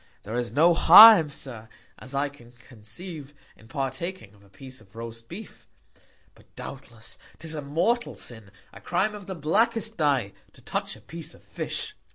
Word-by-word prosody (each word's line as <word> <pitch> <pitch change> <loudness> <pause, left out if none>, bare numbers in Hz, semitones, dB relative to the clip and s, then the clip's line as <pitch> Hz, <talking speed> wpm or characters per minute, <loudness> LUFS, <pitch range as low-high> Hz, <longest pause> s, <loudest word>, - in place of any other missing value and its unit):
There 105 - -8
is 120 -1 -2
no 160 +7 +4
Harm, 185 0 +9
Sir, 120 -6 -9 0.3
as 130 +2 -9
I 140 +1 +1
can 120 -4 -16
conceive, 135 - -11 0.2
in 110 - -19
partaking 135 - -5
of 100 -1 -22
a 100 - -22
Piece 130 +6 -13
of 95 -1 -22
roast 115 0 -9
Beef; 210 +5 -11 0.7
but, - - -25
doubtless, 120 -4 -10 0.2
'tis 160 -1 -6
a 155 - -4
mortal 175 +13 -1
Sin, 110 -4 -9 0.2
a - - -13
Crime 215 - 0
of 205 -3 -10
the 190 - -5
blackest 220 +8 0
Dye, 135 - +1 0.2
to - - -19
touch - - -3
a - - -17
Piece 165 -1 -9
of - - -21
Fish. 430 - -4
140 Hz, 175 wpm, -25 LUFS, 115-175 Hz, 0.7 s, Harm